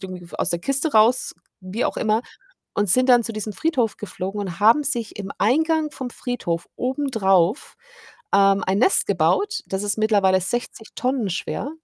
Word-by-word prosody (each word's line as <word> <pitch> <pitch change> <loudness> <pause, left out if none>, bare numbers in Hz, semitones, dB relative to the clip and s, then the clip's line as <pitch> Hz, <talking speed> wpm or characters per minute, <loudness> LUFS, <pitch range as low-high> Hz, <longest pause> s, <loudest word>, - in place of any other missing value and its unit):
irgendwie 180 -2 -9
aus - - 0
der 170 - 0
Kiste 275 - 0
raus, 225 +4 +3 0.3
wie 190 +5 -3
auch - - -2
immer 220 0 +1 0.5
und 205 -2 0
sind 255 +6 +4
dann 245 -1 +6
zu 225 - -4
diesem 215 0 -4
Friedhof 255 - -1
geflogen 195 0 -5
und 190 -2 -5
haben 230 +8 +5
sich 235 -6 -2
im 195 -1 -5
Eingang 315 +7 +1
vom 260 -3 -6
Friedhof 175 -10 -4
obendrauf, 225 - 0 0.6
ähm, 195 0 +4
ein 195 +2 0
Nest 380 - +4
gebaut. 415 +2 +1
Das 190 +1 -3
ist 205 +1 0
mittlerweile 200 -4 +3
60 225 +2 -4
Tonnen 250 -5 -1
schwer. 195 +9 -4
220 Hz, 165 wpm, -22 LUFS, 195-255 Hz, 0.6 s, dann